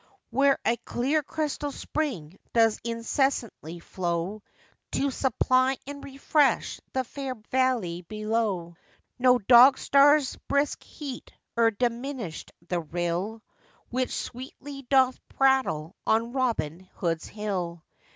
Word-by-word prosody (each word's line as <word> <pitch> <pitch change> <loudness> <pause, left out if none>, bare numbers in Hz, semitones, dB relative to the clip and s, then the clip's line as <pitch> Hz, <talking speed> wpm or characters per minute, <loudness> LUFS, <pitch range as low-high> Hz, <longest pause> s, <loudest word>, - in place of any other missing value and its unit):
Where 275 +3 +4
a 235 - +2
clear 275 +8 0
crystal 295 -1 -3
spring 195 - -4
does 225 -2 +4
incessantly 230 - -1
flow, 175 +3 -3 0.5
To 280 0 +1
supply 255 +1 +2
and 285 +1 -8
refresh 280 +1 +1
the 260 - 0
fair 265 +1 -5 0.2
valley 245 -10 +1
below; 215 -4 -2 0.4
No 250 0 +5
dog 245 +4 +7
star's 280 0 +4
brisk 280 +1 +1
heat 275 -4 -8 0.2
e'er 230 -1 +5
diminished 235 - -3 0.2
the 175 -1 0
rill 175 +7 -3 0.5
Which 255 +1 0
sweetly 270 +2 -7
doth 260 -2 +4
prattle 260 - +1
on 230 +2 +2
'Robin 230 - -1 0.2
Hood's 165 -3 -2
Hill. 180 -6 -4
240 Hz, 110 wpm, -27 LUFS, 195-270 Hz, 0.5 s, dog